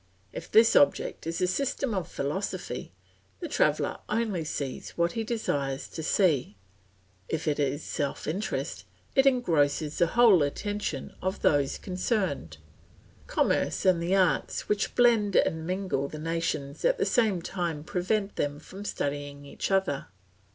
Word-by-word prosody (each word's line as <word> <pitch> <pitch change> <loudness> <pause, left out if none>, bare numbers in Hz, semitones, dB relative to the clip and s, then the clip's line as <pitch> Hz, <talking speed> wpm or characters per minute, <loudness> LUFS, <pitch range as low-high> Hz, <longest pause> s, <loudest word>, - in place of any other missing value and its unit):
If - - -8
this 225 +1 +6
object 145 - +3
is 165 +2 -2
a - - +4
system 265 +4 -1
of 185 -4 -2
philosophy, 175 -1 -4 0.5
the - - -4
traveller - - +1
only 215 -6 0
sees 140 -3 -5
what 170 0 +2
he 225 - -2
desires 145 - -2
to 160 - -6
see; 155 - +1 0.7
if 160 0 -2
it 150 -1 +1
is 145 +1 0
self 140 - -3
interest, 190 +8 -3 0.3
it 270 0 +5
engrosses 155 - +2
the 170 - +5
whole 225 -3 +6
attention 160 0 -2
of 190 +1 -3
those 140 -2 +2
concerned. 185 - -2 0.7
Commerce - - +1
and 180 -3 +4
the 175 +3 +1
arts 180 -7 +1
which 210 0 0
blend 225 -5 +4
and 160 0 +2
mingle 185 -7 -1
the 155 - -8
nations 155 -3 -3
at - - +3
the 415 - +1
same 215 -7 +2
time 170 -3 -3
prevent 195 +4 -1
them 145 0 -1
from 190 +6 -10
studying 145 -5 -4
each 140 - -4
other. 190 -8 0
170 Hz, 145 wpm, -28 LUFS, 145-205 Hz, 0.7 s, this